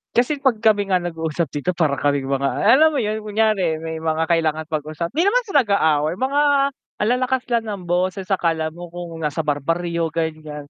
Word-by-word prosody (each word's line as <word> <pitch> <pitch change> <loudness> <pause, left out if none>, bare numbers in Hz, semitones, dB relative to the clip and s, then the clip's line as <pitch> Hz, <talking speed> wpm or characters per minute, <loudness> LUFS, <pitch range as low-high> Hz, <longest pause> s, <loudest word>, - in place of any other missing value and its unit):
Kasi 275 +4 +1
'pag 240 -5 +2
kami 205 -3 +2
nga 185 - +4
nag-uusap 165 -1 -3
dito 145 +5 0
para 160 -5 +1
kaming 140 -1 0
mga 140 0 0
ah, 225 +5 +4
alam 315 +3 +5
mo 295 - -1
yun 215 0 -2
kunyari 210 -6 +1
may 160 0 -5
mga 160 0 -1
kailangan 160 -2 0
pag-usapan 155 - -4
di 330 - +3
naman 405 +6 +3
sa 390 - -7
nag-aaway, 160 -7 +1
mga 275 +3 +1 0.6
ang 210 - +2
lalakas 255 0 0
lang 235 -2 +1
ng 205 -3 -5
boses, 185 +2 0
akala 165 -4 0
mo 175 +2 -10
kung 175 -2 -7
nasa 150 +1 -1
barbaryo, 165 +3 -1
ganyan. 155 -3 -4
170 Hz, 190 wpm, -21 LUFS, 155-215 Hz, 0.6 s, alam